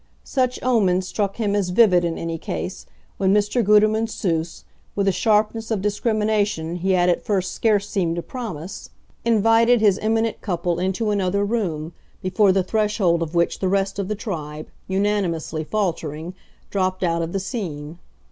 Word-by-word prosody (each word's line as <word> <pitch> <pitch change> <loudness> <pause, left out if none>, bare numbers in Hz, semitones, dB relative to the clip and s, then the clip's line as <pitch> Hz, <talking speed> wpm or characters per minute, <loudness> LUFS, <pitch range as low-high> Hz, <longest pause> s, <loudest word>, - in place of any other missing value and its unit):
Such 255 -2 0
omens 190 -7 +2
struck 200 -1 -2
him 205 -3 0
as 200 -3 0
vivid, 180 -3 +5
in 170 -1 -1
any 165 -1 -4
case, 85 - -5 0.3
when 190 0 +2
Mr. 210 +4 +2
Gutermann 215 +2 +4
Seuss, 165 -6 -2 0.3
with 200 -1 0
a - - +5
sharpness 220 +2 +1
of 220 -3 0
discrimination 210 -5 0
he 190 +2 +1
had 180 -1 +3
at 175 - +1
first 190 -3 0
scarce 205 -2 +1
seemed 175 -5 -1
to 170 - -3
promise, 200 - -7 0.3
invited 230 +1 +4
his 205 -3 +3
eminent 225 +1 0
couple 175 -3 -1
into 190 +4 0
another 200 0 +1
room, 175 -8 -2 0.3
before 190 +2 +3
the 190 0 +2
threshold 205 -4 +1
of 165 +1 -3
which 170 0 +1
the 190 - 0
rest 195 +1 0
of 195 - -2
the 215 - -2
tribe, 155 -8 -6 0.2
unanimously 190 -5 -1
faltering, 165 -3 -3 0.4
dropped 185 -1 0
out 170 -1 +1
of 165 0 -3
the 195 - -1
scene. 170 - -5
195 Hz, 165 wpm, -22 LUFS, 170-215 Hz, 0.4 s, vivid